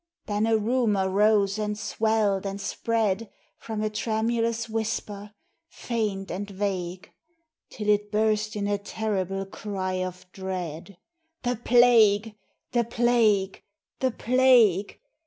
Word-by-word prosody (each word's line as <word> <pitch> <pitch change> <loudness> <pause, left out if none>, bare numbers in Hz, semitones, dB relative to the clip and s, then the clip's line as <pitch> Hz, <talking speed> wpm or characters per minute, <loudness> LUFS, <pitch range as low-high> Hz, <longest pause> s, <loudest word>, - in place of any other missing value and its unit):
Then 210 +1 0
a 225 -1 +3
rumor 215 -3 +1
rose 200 +1 +2
and 210 -1 -2
swelled 215 -3 0
and 195 0 -4
spread 220 0 -1 0.3
From 220 -1 -4
a 215 - 0
tremulous 230 +1 -1
whisper, 210 -2 -4 0.3
faint 210 -9 -3
and 200 +4 -4
vague, 185 -2 -4 0.6
Till 210 -2 -6
it 210 0 +2
burst 215 0 +1
in 205 -1 -2
a 205 0 0
terrible 195 -2 -3
cry 190 -2 -4
of 180 0 -7
dread, 185 -1 -6 0.5
_The 245 -1 -2
plague! 225 -3 +5 0.4
the 240 -1 +2
plague! 230 -4 +2 0.4
the 260 - +2
plague! 235 -6 +3
210 Hz, 120 wpm, -26 LUFS, 195-225 Hz, 0.6 s, plague